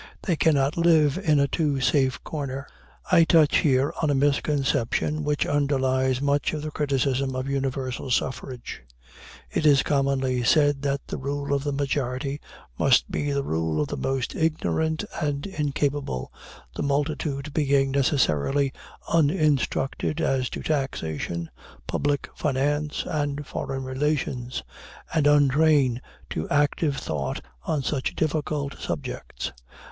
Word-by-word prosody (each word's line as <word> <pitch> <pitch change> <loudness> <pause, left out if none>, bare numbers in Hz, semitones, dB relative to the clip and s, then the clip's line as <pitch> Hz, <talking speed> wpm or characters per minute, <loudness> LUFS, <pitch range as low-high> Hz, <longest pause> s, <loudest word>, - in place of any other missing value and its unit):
They 175 - +1
cannot 145 -2 +2
live 165 -2 +4
in 155 -7 +3
a 140 - +3
too 145 -3 0
safe 130 0 +1
corner. 140 -3 -4 0.5
I 165 - +7
touch 160 -2 +5
here 135 0 +2
on 155 - +2
a 145 - +2
misconception 140 0 +1
which 150 0 0
underlies 130 -2 +1
much 145 +1 +1
of 150 -1 -3
the 155 - -4
criticism 135 -2 0
of 130 +1 -3
universal 135 -2 -2
suffrage. 130 - -3 0.7
It - - -1
is 140 -2 +5
commonly 135 -3 +1
said 145 +1 +3
that 140 -1 -1
the - - -5
rule 140 +1 -2
of 140 -1 0
the 145 - -1
majority 140 0 -2 0.4
must - - +4
be 145 0 -1
the 140 0 0
rule 80 - -1
of 75 - 0
the - - -3
most 130 - -2
ignorant 160 0 0 0.2
and 145 -2 -1
incapable, 145 - -2 0.4
the - - -3
multitude 145 0 -1
being 140 -3 +2
necessarily 135 - +2 0.3
uninstructed 150 -2 +1
as 130 -5 +1
to - - -6
taxation, 85 - -2 0.4
public 145 -1 -1
finance, 145 +1 -1
and 145 -3 -2
foreign 135 0 -4
relations, 130 -2 -2 0.5
and 155 -3 +3
untrained 145 -3 +4 0.3
to 80 - -3
active 145 0 +1
thought 70 -3 -3 0.3
on 150 -3 0
such 135 -1 -2
difficult 150 -2 -1
subjects. - - -5
140 Hz, 130 wpm, -25 LUFS, 130-150 Hz, 0.7 s, I